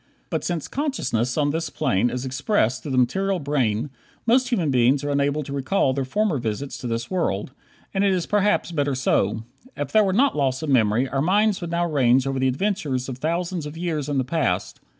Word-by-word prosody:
But - - -1
since 170 -4 -2
consciousness 130 - -1
on 145 -1 +2
this 165 +2 -2
plane 100 +6 +1
is 125 +1 -4
expressed 130 - 0
through 145 - -5
the - - +1
material 190 +10 +1
brain, 135 -4 0 0.3
most 255 +3 +3
human 180 - +1
beings 130 +3 +3
are 145 - -1
unable 140 +1 +1
to 140 - -7
recall 135 +1 +1
their 135 0 -2
former 200 0 0
visits 120 +4 -3
to 125 - -5
this 115 +4 -3
world; 130 - -1 0.4
and 195 0 +1
it 200 - +3
is 180 -3 0
perhaps 205 -3 +1
better 145 -4 0
so. 110 -4 +1 0.3
If 145 -1 -3
there 215 - +5
were 195 - +1
not 265 +8 +3
loss 135 0 0
of 150 - -1
memory 115 0 +3
our 135 +1 -1
minds 205 +5 +2
would 175 - -4
now 170 +1 0
range 135 -5 +3
over 135 -1 -1
the 130 - +2
adventures 140 -4 -1
of 130 -1 -6
thousands 170 +1 -2
of 150 +2 -9
years 160 -4 -2
in 145 - 0
the 130 - +2
past. 125 - -1
145 Hz, 210 wpm, -23 LUFS, 130-175 Hz, 0.4 s, there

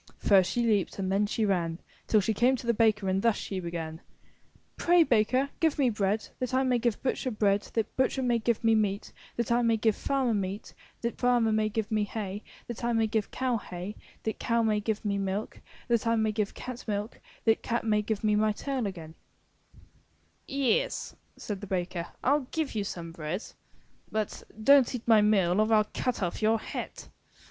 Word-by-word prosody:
First 190 -3 +4
she 240 - 0
leaped 210 -5 +1
and 190 -1 -2
then 200 +2 +2
she 220 +1 0
ran 170 -4 0 0.3
Till 215 - +4
she 220 +3 0
came 245 +5 +3
to 245 - -8
the 235 - +3
baker 215 -3 +2
and 190 +1 +1
thus 230 -1 +3
she 195 - -4
began: 165 -2 -5 0.7
Pray, 345 0 +5
Baker, 255 +2 +2
give 320 -3 +2
me 265 -4 +3
bread, 210 0 0
that 255 0 -2
I 260 - +3
may 250 -2 +2
give 235 -2 -1
butcher 260 0 -1
bread, 205 -3 +1
that 225 -2 -1
butcher 260 0 +1
may 240 -2 +2
give 230 0 0
me 225 0 +4
meat, 210 -1 0 0.2
that 235 -1 -1
I 240 +1 +4
may 230 -1 +3
give 220 -1 +2
farmer 265 -4 0
meat, 200 +1 -3 0.3
that 235 0 -3
farmer 245 -3 +3
may 215 0 +2
give 220 0 -3
me 215 -1 +2
hay, 205 -1 -5 0.2
that 240 0 -7
I 240 0 +1
may 225 -1 +3
give 220 -1 -1
cow 255 -2 0
hay, 185 0 -7 0.3
that 220 - -3
cow 230 -1 +1
may 215 -1 +2
give 215 0 -2
me 200 -1 0
milk, 195 +2 -3 0.3
that 235 -1 +1
I 230 - +3
may 220 -1 +1
give 210 -1 -2
cat 255 -1 -7
milk, 210 +2 -3 0.3
that 225 -1 +3
cat 235 0 -1
may 210 -1 +2
give 210 0 -3
me 210 -1 +3
my 215 0 +2
tail 265 +1 -3
again/' 165 -5 -8 1.4
/'Yes," 280 - 0 0.2
says 205 -3 -5
the 205 - -8
baker, 175 -2 -2 0.2
'Til 280 0 +2
give 315 -3 -2
you 210 -2 -1
some 170 -4 -6
bread, 165 +4 -4
t^ - - -12 0.6
*'But 215 -1 -2 0.2
don't 275 0 +6
eat 240 - -7
my 220 -2 +6
meal 200 -2 +3
or 215 +1 +1
I'll 215 -1 +4
cut 250 -5 -1
off 175 +4 -2
your 220 +1 +3
head!" - - -6
220 Hz, 205 wpm, -29 LUFS, 200-235 Hz, 1.4 s, don't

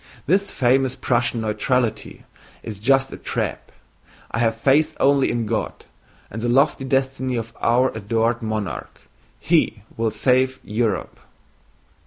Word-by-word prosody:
This 195 +5 +2
famous 130 +1 +2
Prussian 120 -1 0
neutrality 110 +2 -1 0.4
is 105 -3 -7
just 135 +4 +2
a - - -7
trap. - - -4 0.6
I - - -2
have 115 -1 +2
faith 140 +6 +2
only 140 0 +3
in 120 -1 -1
God - - -3 0.5
and 110 +4 -5
the 120 - -1
lofty 135 +2 +3
destiny 130 -1 0
of 115 -1 -4
our 125 +3 +3
adored 115 +3 0
monarch. 110 -3 -4 0.4
He 155 - +1
will 115 0 +1
save 130 +4 +1
Europe!" 110 -2 -2
120 Hz, 130 wpm, -22 LUFS, 110-135 Hz, 0.6 s, only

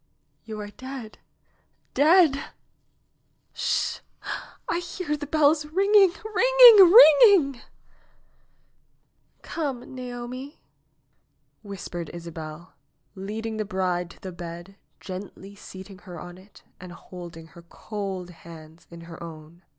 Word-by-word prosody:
^Wou 220 -1 -6
are - - -13
dead 260 -2 -9 0.4
— - - -44
dead 315 +1 +5
I 275 - -8 1.0
Sh! - - -1 0.7
I 345 - -1
hear 350 -3 -4
the 290 -1 -7
bells 300 0 +2
ringing, 390 +3 +4
ringing, 460 -4 +7
ringing 315 - +7 0.9
!" - - -44
'^Come, 275 -7 -5
Naomi 255 +2 -8 0.5
!" - - -47
whispered 180 -5 -7
Isabel, 165 0 -9 0.4
leading 215 +3 -6
the 215 - -1
bride 185 -3 -2
to - - -16
the 190 - -7
bed, 175 +2 -9 0.2
gently 195 +1 -9
seating 190 -1 -12
her 180 -4 -11
on 175 +2 -11
it 195 +2 -19 0.2
and 180 0 -11
holding 170 -2 -11
her 170 - -13
cold 190 0 -7
hands 165 -1 -15
in 170 0 -12
her 165 0 -12
own. 165 0 -11
205 Hz, 120 wpm, -25 LUFS, 175-290 Hz, 1.0 s, ringing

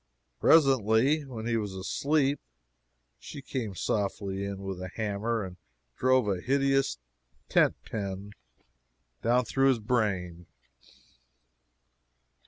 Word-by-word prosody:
Presently 135 0 +4
when 115 -5 -7
he 115 -1 +1
was 105 -3 -3
asleep 140 +9 0 0.8
she - - -9
came 115 -8 -4
softly 100 0 -2
in 100 -1 -5
with 95 -2 -5
a 95 - -4
hammer 110 +3 -2
and 90 -1 -8 0.4
drove 130 -3 +3
a 95 -3 -1
hideous 135 - +1 0.5
tent - - +4
pen 100 -1 -5 0.9
down 120 +2 +2
through 135 +2 +2
his 130 -3 +2
brain! 95 -7 -1
110 Hz, 105 wpm, -29 LUFS, 100-130 Hz, 0.9 s, Presently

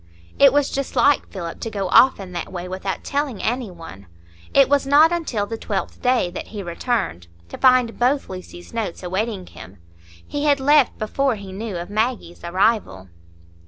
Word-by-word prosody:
It 275 -1 +8
was 285 0 +1
just 275 0 -3
like 280 +3 +3
Philip, 170 -3 -7
to 225 - -4
go 200 -3 -3
off 260 -3 +6
in 190 -2 -8
that 175 -1 -5
way 180 -1 -5
without 190 +1 -4
telling 285 -7 -2
any 240 +1 -2
one. 165 - -12 0.4
It 275 -1 +5
was 280 -1 +2
not 300 +4 +6
until 305 -12 -1
the 225 +2 -6
twelfth 200 -3 -4
day 250 -8 +2
that 180 - -7
he 210 -2 -7
returned, 170 - -2 0.2
to - - -8
find 255 -3 +4
both 265 +3 +1
Lucy's 185 0 -10
notes 220 -6 -4
awaiting 190 +2 -2
him; 95 - -13 0.5
he 290 0 -3
had 285 -2 +3
left 285 0 +4
before 255 +4 0
he 200 -2 -9
knew 205 -1 -5
of 175 +3 -7
Maggie's 215 -6 -2
arrival. 175 - 0
220 Hz, 180 wpm, -21 LUFS, 185-265 Hz, 0.5 s, It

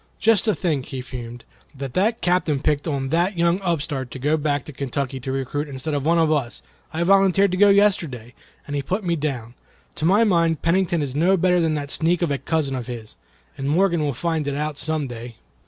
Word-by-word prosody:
"Just 225 -2 +3
to 215 - +2
think," 155 -8 -1
he 135 -3 -5
fumed, 120 -2 -8 0.3
"that 135 -2 -5
the 210 - +2
Captain 175 -5 +1
picked 150 +2 0
on 135 -3 -2
that 175 +5 +1
young 170 +3 +2
upstart 150 -7 -2
to 125 - -8
go 145 +4 +1
back 145 -2 -1
to 150 - -9
Kentucky 135 0 -3
to 130 +1 -5
recruit 135 +3 -2
instead 140 +3 -4
of 140 -2 -1
one 165 +3 +3
of 160 -2 +3
us. 120 - -1 0.3
I 165 +2 -1
volunteered 195 +1 +4
to 185 - -1
go 205 +1 +6
yesterday, 165 - +2 0.3
and 145 - -5
he 140 - 0
put 190 +9 -2
me 170 -2 0
down. 135 -7 -3 0.4
To 155 - -2
my 200 +6 +5
mind, 170 -7 +2
Pennington 170 -2 +1
is 135 -3 -4
no 175 +7 +3
better 180 0 +3
than 160 -2 +1
that 145 -1 -4
sneak 170 +2 +1
of 165 - 0
a 140 - -1
cousin 140 -1 -1
of 125 -2 -5
his, 115 -3 -8 0.4
and 135 +1 -2
Morgan 170 +1 +2
will 145 -3 -1
find 160 +1 -1
it 140 - -1
out 150 +1 -2
some 155 0 -1
day." 120 -2 -8
155 Hz, 220 wpm, -22 LUFS, 135-175 Hz, 0.4 s, go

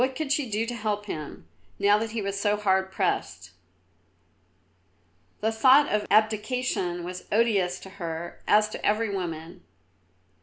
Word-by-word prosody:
What 260 +1 +1
could 305 -2 -3
she 285 -4 +1
do 215 +2 0
to 240 - -4
help 210 -2 -2
him, 150 - -7 0.3
now 205 +1 +4
that 225 +1 -3
he 220 -1 -3
was 200 0 -3
so 205 +1 +1
hard 190 -2 +1
pressed? 95 - -2 1.9
The 220 +1 +1
thought 260 +6 +5
of 210 0 0
abdication 215 -4 +1
was 180 +1 -7
odious 200 -5 +2
to 190 - -10
her, 165 +1 -5
as 210 0 +5
to - - -8
every 215 0 +1
woman. 170 -1 -5
210 Hz, 150 wpm, -26 LUFS, 180-225 Hz, 1.9 s, thought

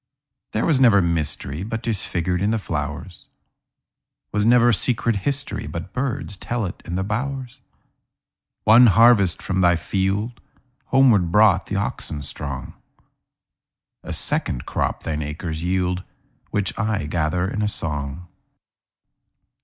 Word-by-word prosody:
There 110 - 0
was 150 -6 +3
never 115 -6 +6
mysteryBut 85 - -2
'tis 110 -5 -1
figured 90 +1 -2
in 100 - +1
the 110 - +1
flowers; 80 -1 -5 1.1
SWas 105 0 +1
never 120 0 +5
secret 115 +1 +2
historyBut 100 - -4
birds 125 -6 -3
tell 120 +2 -3
it 90 - -7
in 90 - -4
the 95 - -1
bowers. 125 +4 -4 1.0
One 115 +3 +7
harvest 105 -3 +4
from 95 0 -1
thy 90 -1 +4
fieldHomeward 115 - 0
brought 105 0 +4
the 100 - -3
oxen 80 -7 -3
strong;A 70 -1 -11
second 60 - +2
crop - - -2
thine 75 -1 -3
acres 80 +2 -5
yield, 90 0 -1 0.5
Which 100 -1 -1
I 110 -7 -1
gather 85 +3 -1
in 105 - -3
a 105 - +1
song. 75 -3 -4
100 Hz, 120 wpm, -22 LUFS, 85-115 Hz, 1.1 s, One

